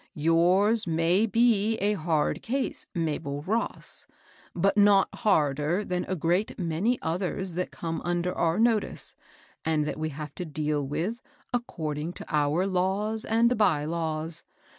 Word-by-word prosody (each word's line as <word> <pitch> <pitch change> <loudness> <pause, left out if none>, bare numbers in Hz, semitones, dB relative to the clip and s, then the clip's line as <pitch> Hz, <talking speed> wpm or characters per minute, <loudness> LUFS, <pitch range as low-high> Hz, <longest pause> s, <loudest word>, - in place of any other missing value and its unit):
Yours 180 +8 +3
may 170 +6 +2
be 225 -1 +3
a 205 +2 +1
hard 160 -5 0
case, 265 +4 -2
Mabel 145 -3 -2
Ross; 220 +7 -3 0.5
but 195 +3 +2
not 205 -2 +5
harder 160 - +1
than 180 -1 -2
a 190 - -1
great 175 +5 0
many 180 +7 0
others 180 +2 -2
that 180 +2 -2
come 165 -1 -4
under 175 +1 -1
our 165 +1 +1
no 225 -1 +4
tice, - - -7 0.5
and 155 -2 +1
that 150 - -4
we 155 0 -1
have 150 +1 -7
to 180 - -5
deal 150 -3 -2
with 190 - -3 0.3
according 160 -9 -3
to - - -9
our 150 +4 +1
laws 195 +4 0
and 235 +2 +3
by 165 -9 +3
laws. 160 0 -3
175 Hz, 145 wpm, -27 LUFS, 155-205 Hz, 0.5 s, not